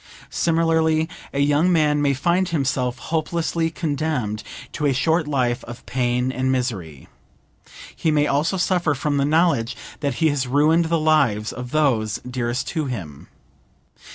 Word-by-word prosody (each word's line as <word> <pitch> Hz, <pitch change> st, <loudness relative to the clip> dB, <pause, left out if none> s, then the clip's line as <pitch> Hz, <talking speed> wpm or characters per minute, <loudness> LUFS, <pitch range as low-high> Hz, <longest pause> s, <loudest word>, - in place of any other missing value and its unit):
Similarly, 160 Hz, -1 st, +2 dB, 0.2 s
a 140 Hz, -, -1 dB
young 145 Hz, +5 st, +3 dB
man 150 Hz, -3 st, +3 dB
may 140 Hz, -1 st, +2 dB
find 175 Hz, +6 st, +1 dB
himself 130 Hz, -5 st, -1 dB
hopelessly 165 Hz, 0 st, -1 dB
condemned 145 Hz, -, -2 dB, 0.3 s
to 150 Hz, -, -1 dB
a 140 Hz, -, +2 dB
short 160 Hz, +4 st, +1 dB
life 125 Hz, -4 st, 0 dB
of 120 Hz, 0 st, -10 dB
pain 125 Hz, 0 st, 0 dB
and 130 Hz, 0 st, -1 dB
misery. 100 Hz, -, -3 dB, 0.9 s
He 160 Hz, -, 0 dB
may 150 Hz, -1 st, +3 dB
also 150 Hz, +6 st, +1 dB
suffer 175 Hz, -4 st, +1 dB
from 145 Hz, +1 st, -1 dB
the 140 Hz, -, +2 dB
knowledge 150 Hz, -6 st, +2 dB, 0.2 s
that 140 Hz, -4 st, -1 dB
he 160 Hz, +6 st, +2 dB
has 140 Hz, -3 st, -1 dB
ruined 155 Hz, +6 st, +3 dB
the 165 Hz, +1 st, +1 dB
lives 140 Hz, -9 st, +2 dB
of 125 Hz, -1 st, -7 dB
those 125 Hz, -8 st, +1 dB
dearest 125 Hz, 0 st, -2 dB
to 160 Hz, -3 st, -2 dB
him. 85 Hz, -, -7 dB
145 Hz, 150 wpm, -22 LUFS, 125-160 Hz, 0.9 s, young